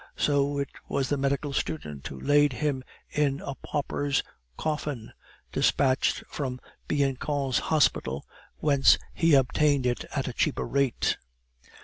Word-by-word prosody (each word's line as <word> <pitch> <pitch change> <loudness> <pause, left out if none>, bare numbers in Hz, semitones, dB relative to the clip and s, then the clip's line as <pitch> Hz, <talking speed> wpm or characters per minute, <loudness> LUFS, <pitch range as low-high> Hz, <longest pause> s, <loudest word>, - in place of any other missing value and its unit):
So 145 -1 +2
it 140 -1 -1 0.2
was 135 -2 0
the 145 - +2
medical 140 +1 -1
student 75 - -3
who 70 - -8
laid 145 - +4
him 135 +1 -1 0.3
in 145 -2 +1
a 140 - -5
pauper's 145 0 -1 0.3
coffin, 150 -6 -3 0.4
despatched 130 -1 +2
from 130 -3 -4 0.3
Bianchon's 140 -1 0
hospital, 130 - +1 0.3
whence 140 -3 +5 0.2
he 165 -3 +4
obtained 140 +1 +3
it 120 -1 0
at 135 - -1
a 125 - -3
cheaper 145 - 0
rate. 140 -3 +1
140 Hz, 125 wpm, -27 LUFS, 130-145 Hz, 0.4 s, whence